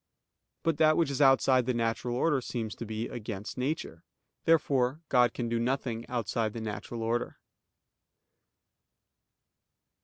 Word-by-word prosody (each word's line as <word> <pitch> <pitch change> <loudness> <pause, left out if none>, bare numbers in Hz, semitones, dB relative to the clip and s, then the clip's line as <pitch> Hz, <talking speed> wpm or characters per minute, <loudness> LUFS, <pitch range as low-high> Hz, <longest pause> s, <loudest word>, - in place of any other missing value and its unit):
But 165 -2 +1
that 155 -1 +5
which 165 -4 +2
is 140 - -1
outside 130 -2 +5
the 125 - +1
natural 115 +1 -1
order 140 +1 +2
seems 115 -3 -4
to 115 - -7
be 110 +1 -3
against 105 -3 -6
nature. 125 - -3 0.4
Therefore 145 -3 +2
God 125 -2 +4
can 120 - -3
do 115 0 0
nothing 120 -1 -2
outside 115 -2 -1
the 115 - -5
natural 110 +2 -5
order. 120 +2 -1
120 Hz, 130 wpm, -29 LUFS, 115-135 Hz, 0.4 s, that